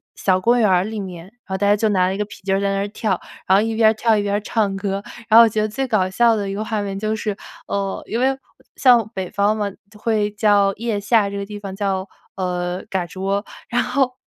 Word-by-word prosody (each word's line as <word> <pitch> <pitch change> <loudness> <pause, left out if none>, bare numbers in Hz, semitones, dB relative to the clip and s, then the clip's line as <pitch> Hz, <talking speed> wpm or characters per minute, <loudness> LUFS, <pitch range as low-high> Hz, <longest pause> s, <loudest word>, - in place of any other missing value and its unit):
小 185 -1 +1
公 240 +4 +3
园 220 - +4
儿 180 -1 +3
里 215 +2 -5
面， 180 -4 -7
然 190 - -17
后 190 -1 -3
大 200 - +2
家 205 - +5
就 220 +1 +1
拿 185 -2 +2
了 190 - -1
一 - - -5
个 210 - -1
皮 205 - -12
筋 195 +1 0
在 200 0 0
那 195 - -1
儿 200 - -1
跳， 205 -3 -2 0.3
然 190 - +4
后 200 - +5
一 225 +1 -1
边 220 -1 +5
儿 - - -2
跳 220 0 +2
一 205 - 0
边 200 - -1
儿 205 - +2
唱 205 -2 0
歌。 195 0 -3 0.3
然 225 +1 +8
后 - - +10
我 - - +5
觉 215 0 -1
得 215 - +1
最 265 +5 -2
搞 195 -5 +1
笑 230 +3 +3
的 200 -2 -2
一 195 - -3
个 215 +2 -3
画 215 -2 -1
面 195 -1 -4
就 215 +2 -1
是 210 -2 -3 0.3
呃， 195 -1 -2
因 230 - -2
为 265 +2 +2 0.4
像 245 -5 +5
北 190 -3 -4
方 205 +1 +1
嘛 205 -2 -2 0.2
会 210 -1 0
叫 205 -2 +3
腋 225 -2 -2
下 205 0 +2
这 200 - -5
个 200 - -4
地 205 0 -8
方 195 -2 -7
叫， 195 -1 -2 0.3
呃， 180 -1 -3
嘎 185 -2 -1
吱 185 +2 -9
窝， 200 +1 -1 0.2
然 240 - +1
后 255 0 0
205 Hz, 290 characters per minute, -21 LUFS, 195-220 Hz, 0.4 s, 后